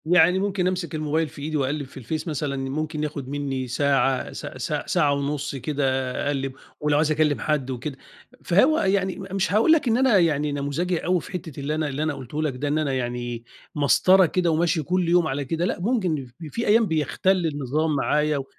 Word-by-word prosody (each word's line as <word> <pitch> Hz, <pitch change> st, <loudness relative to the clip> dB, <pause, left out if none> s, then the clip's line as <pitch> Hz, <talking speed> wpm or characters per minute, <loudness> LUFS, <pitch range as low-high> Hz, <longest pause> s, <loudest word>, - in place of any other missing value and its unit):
يعني 180 Hz, +2 st, +5 dB
ممكن 195 Hz, -2 st, 0 dB
أمسك 185 Hz, -3 st, -2 dB
الموبايل 155 Hz, +1 st, 0 dB
في 140 Hz, -, -11 dB
إيدي 155 Hz, +1 st, -2 dB
وأقلّب 140 Hz, +1 st, -1 dB
في 135 Hz, -, -15 dB
الفيس 150 Hz, +7 st, -4 dB
مثلًا، 150 Hz, -2 st, -2 dB
ممكن 155 Hz, +2 st, -3 dB
ياخُد 140 Hz, -3 st, -4 dB
منّي 135 Hz, -2 st, -3 dB
ساعة، 135 Hz, 0 st, +1 dB
س -, -, -7 dB
س -, -, -3 dB
ساعة 150 Hz, -5 st, +2 dB
ونُص 140 Hz, 0 st, -2 dB
كده 145 Hz, +2 st, -2 dB, 0.4 s
أقلّب، 135 Hz, -2 st, -2 dB, 0.3 s
ولو 150 Hz, -1 st, +1 dB
عايز 155 Hz, +1 st, +2 dB
أكلّم 150 Hz, -1 st, +2 dB
حد 145 Hz, -4 st, -1 dB
وكده. 130 Hz, +2 st, -5 dB, 0.5 s
فهو 260 Hz, -, +4 dB
يعني 190 Hz, -1 st, +1 dB
م 195 Hz, -, -7 dB
مش 190 Hz, -1 st, 0 dB
هاقول 220 Hz, +9 st, +4 dB
لك 320 Hz, -5 st, +4 dB
إن 230 Hz, 0 st, +3 dB
أنا 260 Hz, -5 st, +4 dB
يعني 150 Hz, -4 st, +2 dB
نموذجي 145 Hz, +6 st, -1 dB
أوي 180 Hz, -1 st, +2 dB
في -, -, -11 dB
حتّة 170 Hz, -6 st, -6 dB
اللي 145 Hz, +2 st, -2 dB
أنا 155 Hz, -1 st, -1 dB
اللي 140 Hz, +2 st, -2 dB
أنا 155 Hz, -1 st, 0 dB
قُلته 135 Hz, +2 st, -5 dB
لك 145 Hz, -4 st, -1 dB
ده، 140 Hz, +3 st, -3 dB
إن 145 Hz, +2 st, +1 dB
أنا 150 Hz, -3 st, 0 dB
يعني 120 Hz, -2 st, -3 dB, 0.3 s
مسطرة 185 Hz, +6 st, +5 dB
كده 175 Hz, 0 st, +1 dB
وماشي 165 Hz, 0 st, +1 dB
كل 180 Hz, +2 st, 0 dB
يوم 175 Hz, -1 st, +4 dB
على 140 Hz, -1 st, -2 dB
كده 165 Hz, +5 st, -1 dB
لأ، -, -, -2 dB
ممكن 180 Hz, -, 0 dB
ف 120 Hz, -, -17 dB, 0.2 s
في 235 Hz, -, -3 dB
أيام 225 Hz, +2 st, +5 dB
بيَختَل 170 Hz, +3 st, +1 dB
النظام 150 Hz, +1 st, -1 dB
معايا 150 Hz, +1 st, +1 dB
و 135 Hz, -, -4 dB
155 Hz, 205 wpm, -24 LUFS, 140-180 Hz, 0.5 s, يعني